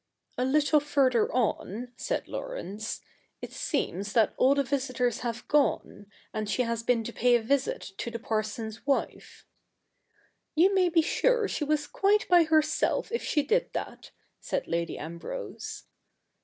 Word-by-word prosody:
' - - -55
A - - +2
little 295 +2 +4
further 270 -6 +2
on,' 245 -1 -1
said - - -3
Laurence, 220 - -5 0.2
' - - -42
it - - -6
seems 200 +3 -2
that 225 -3 +3
all 270 +2 +4
the 280 - +2
visitors 255 -3 -1
have 235 -1 -4
gone; 285 -7 +1 0.3
and 215 -1 -3
she 250 - +1
has 230 -1 -2
been 230 -1 +1
to 235 - -6
pay 245 +1 +4
a 240 - +2
visit 270 -4 -1
to - - -3
the 230 - -5
parson's 220 0 -3
wife.' 275 - -2 0.5
' - - -40
You 365 +5 +5
may 370 -2 +4
be 330 -1 +3
sure 480 +5 +2
she 325 - -2
was 300 0 0
quite 415 +2 +2
by 350 -2 +6
herself 310 +4 +1
if 470 - -1
she 295 - +1
did 470 - 0
that,' - - -6 0.3
said - - -3
Lady 170 0 -2
Ambrose. 170 - -7
255 Hz, 165 wpm, -28 LUFS, 225-310 Hz, 0.5 s, by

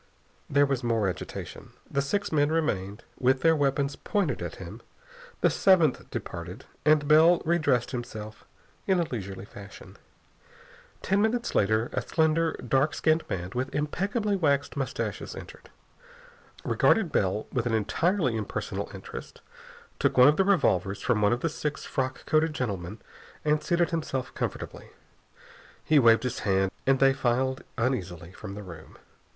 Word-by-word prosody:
There 145 +1 +4
was 135 -3 -2
more 115 -4 +1
agitation. 90 - -6
The 140 - 0
six 200 +9 -2
men 145 -1 +2
remained; 105 -11 -1 0.2
with 130 +1 +2
their 165 -1 +4
weapons 140 -1 0
pointed 205 -5 -1
at - - -5
him. - - -9 0.6
The - - +4
seventh 170 -8 +3
departed, 90 +7 -7 0.2
and 150 -1 +4
Bell 160 +3 +6
re 170 +2 +2
dressed 125 -6 +1
himself 110 -4 -7 0.4
in 190 -2 +3
a - - +3
leisurely 100 -3 -5
fashion. 100 -1 -12 1.1
Ten 195 +2 +2
minutes 235 +2 0
later 110 +3 +1
a - - 0
slender, 160 0 +1
dark 135 +4 +2
skinned 160 +1 +2
man 90 0 -4
with 130 +2 -3
impeccably 200 +8 -1
waxed 145 -6 +1
moustaches 135 -3 -4
entered, - - -11 0.9
regarded 195 -8 +2
Bell 100 +2 0
with 120 -2 0
an 115 - +1
entirely 155 - +1
impersonal 110 -2 -4
interest, - - -9 0.6
took - - +1
one 125 +1 +8
of 150 - +3
the 195 - +4
revolvers 100 - +2
from 120 -4 +1
one 105 - +4
of 120 - 0
the - - +1
six 150 -2 -4
frock 130 -1 -3
coated 155 0 +2
gentlemen, 100 -5 -4 0.5
and 150 0 +2
seated 175 0 +1
himself 150 -6 -3
comfortably. - - -5 0.9
He 155 -2 +4
waved 115 -2 +5
his 125 -1 -2
hand 95 -1 +1 0.2
and 135 0 +5
they 135 0 +5
filed 130 0 0
uneasily 90 -9 -2
from 95 +1 -9
the 105 - -7
room. 85 -4 -12
135 Hz, 150 wpm, -27 LUFS, 110-160 Hz, 1.1 s, one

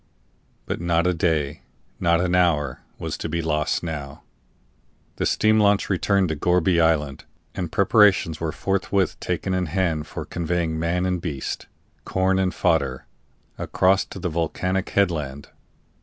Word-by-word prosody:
But - - -4
not 85 -1 +1
a 90 - +3
day, 80 -4 0 0.4
not 85 -1 +3
an 90 0 0
hour, 75 -7 +2 0.2
was - - -5
to 80 - -4
be 85 +1 -2
lost 75 0 0
now. 75 -5 -6 0.9
The - - 0
steam 110 +1 +3
launch 100 -1 +3
returned 95 -1 +2
to 80 - -1
Gourbi 90 +2 +2
Island, 75 -4 +1 0.3
and 90 -4 -4
preparations 100 -5 +4
were 80 -1 -2
forthwith 95 +1 -1
taken 95 - -2
in 90 -1 0
hand 80 -3 -1
for - - -6
conveying 85 -1 -2
man 85 +2 0
and 90 -2 -1
beast, 75 -7 -4 0.4
corn 95 0 +1
and 95 -1 +1
fodder, 70 -10 0 0.5
across 95 +1 +2
to - - -10
the 90 -1 -2
volcanic 90 +4 -1
headland. 75 -8 -1
85 Hz, 145 wpm, -23 LUFS, 80-95 Hz, 0.9 s, preparations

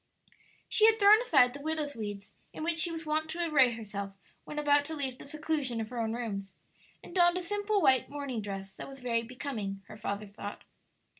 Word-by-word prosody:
She 435 - +5
had 445 0 +5
thrown 420 +1 +7
aside 260 - +4
the 285 - -8
widow's 305 -1 -2
weeds 205 -2 -6 0.2
in - - -6
which 330 0 0
she 340 +1 +5
was 325 0 -5
wont 310 +1 0
to 340 +1 -2
array 265 -6 +5
herself 200 -3 -6 0.3
when 300 - -7
about 290 -1 +4
to 320 +2 -4
leave 265 -4 -3
the - - -10
seclusion 295 -5 -2
of 220 -1 -4
her 245 -1 -5
own 225 -1 -1
rooms, 200 -5 -4 0.5
and - - -11
donned 350 -1 +4
a - - -1
simple 410 +2 0
white 260 -2 +4
morning 280 -5 -4
dress 195 -1 -6
that - - -6
was 270 0 -10
very 235 -2 0
becoming, 225 -5 -5
her 215 +1 -11
father 210 0 -3
thought. 205 0 -8
270 Hz, 210 wpm, -30 LUFS, 215-315 Hz, 0.5 s, thrown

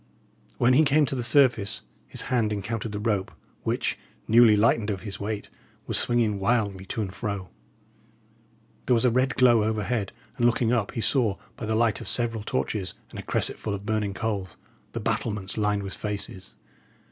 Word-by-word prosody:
When 125 +2 +4
he 150 +5 +6
came 150 +1 +4
to - - -3
the 130 - -1
surface 120 -6 +3 0.2
his - - -1
hand 115 -4 +2
encountered 105 +2 -3
the 105 - -4
rope, 105 -3 -1 0.3
which, - - -1 0.3
newly 115 -1 +6
lightened 110 0 +3
of 95 -2 -3
his 100 -2 -6
weight, 105 0 -4 0.3
was - - -2
swinging 115 -4 +2
wildly 100 -3 0
to 110 - -2
and 95 -2 -6
fro. 100 -5 -4 1.4
There 125 - +4
was 115 - +2
a 125 - +4
red 130 +3 +1
glow 120 -4 +5
overhead, 110 -1 -1 0.3
and 120 -2 +4
looking 120 0 +2
up, 115 -4 0
he 115 - -2
saw, 115 -2 +3 0.2
by 110 - -6
the 110 - 0
light 115 -2 +2
of - - -7
several 115 -2 0
torches 100 -3 -2 0.2
and - - -8
a - - -3
cresset - - 0
full 105 - -3
of 100 0 -8
burning 105 -2 -1
coals, 100 -5 -3 0.4
the - - -3
battlements 105 -3 -2
lined 105 -2 0
with 95 - -5
faces. 100 -3 -6
110 Hz, 180 wpm, -26 LUFS, 100-120 Hz, 1.4 s, he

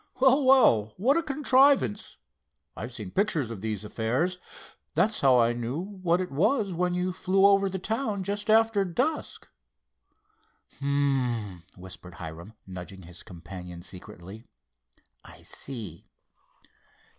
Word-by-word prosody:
"Well, 265 +2 +5
well, 115 - +5
what 250 +10 +3
a 335 - +2
contrivance. 275 - +2 0.6
I've 120 +3 -6
seen 105 -6 -7
pictures 165 - 0
of 105 -4 -7
these 110 -2 -3
affairs. 125 - -1 0.6
That's 205 +7 +2
how 130 -2 +5
I 120 0 +3
knew 120 +3 -4
what 185 -2 -1
it 185 -4 -3
was 200 - +1
when 180 +1 0
you 180 +1 -1
flew 195 +2 +2
over 200 -1 +5
the 190 - -3
town 215 0 -2
just 205 +2 -3
after 220 -2 +4
dusk." 255 - -2 1.3
"H'm!" 130 -9 -1 0.2
whispered 90 -1 -9
Hiram, 85 +5 -9
nudging 95 0 -9
his 85 +1 -10
companion 90 0 -10
secretly. 95 +3 -10 0.8
"I - - -13
see." 110 - -8
145 Hz, 125 wpm, -27 LUFS, -, 1.3 s, Well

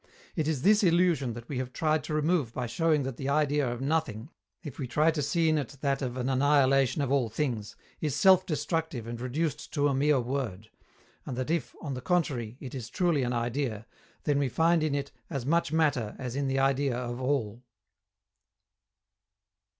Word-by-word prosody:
It 155 -3 0
is 150 -4 -1
this 210 +3 +5
illusion 170 - +3
that 120 +1 -9
we 135 - -3
have 130 -1 -4
tried 155 0 +1
to 155 - -4
remove 155 -5 +1
by 125 - -2
showing 155 +3 +1
that 130 -2 -5
the 135 0 -3
idea 145 -3 +2
of 120 +1 -5
Nothing, 140 -3 -1 0.3
if 145 -6 -8
we 135 - -3
try 150 +6 +3
to 155 -2 -2
see 165 +4 +1
in 155 -1 +3
it 140 0 -6
that 140 -1 0
of 125 -1 -3
an 125 0 -2
annihilation 135 0 +3
of 135 - -2
all 135 -5 +2
things, 115 -3 -3 0.2
is 150 -4 -1
self 190 -1 +6
destructive 160 -6 -2
and 120 0 -6
reduced 150 +4 -2
to 145 -2 +2
a 140 - +1
mere 140 +1 +3
word; 120 -5 -4 0.5
and 125 - -6
that 130 +4 -2
if, 165 -6 -2
on 145 -3 -3
the 125 - -5
contrary, 125 -8 -1
it 130 - -8
is 120 -4 -6
truly 170 +1 +1
an 125 -1 -1
idea, 120 -2 -2 0.4
then 145 -2 +1
we 140 -2 +1
find 165 +4 +3
in 155 -2 0
it 140 0 -3 0.2
as 135 -4 -4
much 165 +1 +1
matter 145 -9 +1
as 125 -2 -5
in 140 0 -1
the 135 0 0
idea 135 -1 +1
of 120 0 -4
All. 125 -4 -1
140 Hz, 195 wpm, -29 LUFS, 125-155 Hz, 0.5 s, self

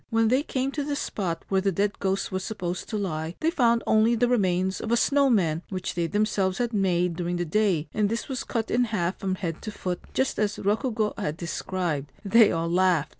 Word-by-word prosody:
When 225 -1 +2
they 255 +3 +3
came 270 -2 -2
to 290 0 -2
the 290 0 -2
spot 185 - -3
where 190 -1 +1
the 195 0 +1
dead 200 +3 -1
ghost 195 +1 -1
was 185 0 -2
supposed 185 -4 -4
to 215 - -2
lie, 165 -4 -3
they 325 - +1
found 235 -6 +2
only 220 +2 +4
the 245 +2 +2
remains 190 -5 +1
of 225 - -4
a 235 - +4
snow 280 +2 +3
man 170 -9 +2
which 185 -2 -3
they 170 -1 -1
themselves 200 -2 0
had 240 -1 -1
made 180 -4 +1
during 175 +1 -2
the 175 0 -1
day; 175 -3 +1
and 210 -1 +1
this 230 +1 -3
was 265 -2 -3
cut 225 -3 -3
in 245 +1 +3
half 190 -5 -2
from 190 -1 -1
head 170 -4 -4
to 215 - -5
foot, 180 -3 -4 0.2
just 265 -4 0
as 210 -1 0
Rokugo 215 +1 0
had 155 -6 -2
described. 170 -5 -3
They 220 +1 +6
all 165 0 -1
laughed. 175 -3 +2
200 Hz, 225 wpm, -26 LUFS, 175-225 Hz, 0.2 s, They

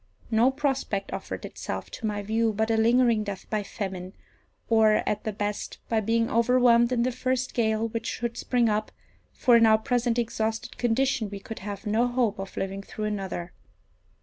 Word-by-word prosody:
No 230 +3 +5
prospect 265 -8 -2
offered - - -5
itself - - -6
to 230 - -4
my 205 -1 -2
view 220 +2 +1
but 220 +2 0
a - - +3
lingering 230 0 +3
death 200 -2 -6
by 215 -1 +1
famine, 190 -2 -5 0.5
or, 220 -2 +4
at 210 0 -1
the 215 - 0
best, 205 0 -4
by 225 - +2
being 230 +2 +1
overwhelmed 235 0 +4
in 240 -2 +2
the 255 - +1
first 255 +1 -1
gale 220 -1 +1
which 230 0 -4
should 235 0 -3
spring 245 -2 +1
up, 215 0 0 0.4
for 245 - +4
in 230 -1 +6
our 220 0 +6
present 240 0 0
exhausted 225 0 -2
condition 240 -2 +1
we 200 0 -6
could 225 +3 -8
have 200 +1 -6
no 220 +4 +2
hope 240 -5 0
of 195 0 -7
living 195 +1 -3
through 215 +2 -6
another. 195 -4 -4
225 Hz, 180 wpm, -26 LUFS, 210-240 Hz, 0.5 s, in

